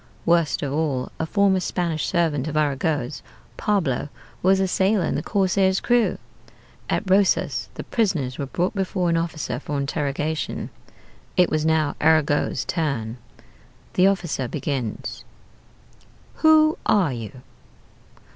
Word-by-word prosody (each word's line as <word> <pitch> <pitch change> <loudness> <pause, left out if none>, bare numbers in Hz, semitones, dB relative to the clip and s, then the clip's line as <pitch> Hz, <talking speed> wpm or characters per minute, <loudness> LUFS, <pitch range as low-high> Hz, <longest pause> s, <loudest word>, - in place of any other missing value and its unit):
Worst 170 -3 +2
of 140 -1 -2
all, 145 -5 -1
a 160 - -1
former 200 0 +3
Spanish 170 -3 -2
servant 160 -5 0
of 155 0 -2
Arago's 145 - 0 0.3
Pablo 170 -10 0 0.3
was 190 +1 +4
a 190 - +2
sailor 190 0 +2
in - - -1
the 145 - -1
corsair's 190 0 +2
crew! 240 -2 +2 0.7
At - - -1
Rosas 190 +1 +2
the - - -6
prisoners 165 - -1
were 140 - -2
brought 180 +8 -1
before 185 -3 0
an 165 - +2
officer 160 -6 -3
for 145 0 -4
interrogation. 145 +2 -2 0.7
It 180 - +4
was 155 0 +1
now 155 -2 +1
Arago's 155 -2 +2
turn. 140 -11 -2 0.8
The 185 - +5
officer 170 -9 -1
begins: 125 -3 -4 1.1
"'Who 315 0 +5
are 180 -10 +3
you?' 120 +2 -8
160 Hz, 130 wpm, -23 LUFS, 145-190 Hz, 1.1 s, The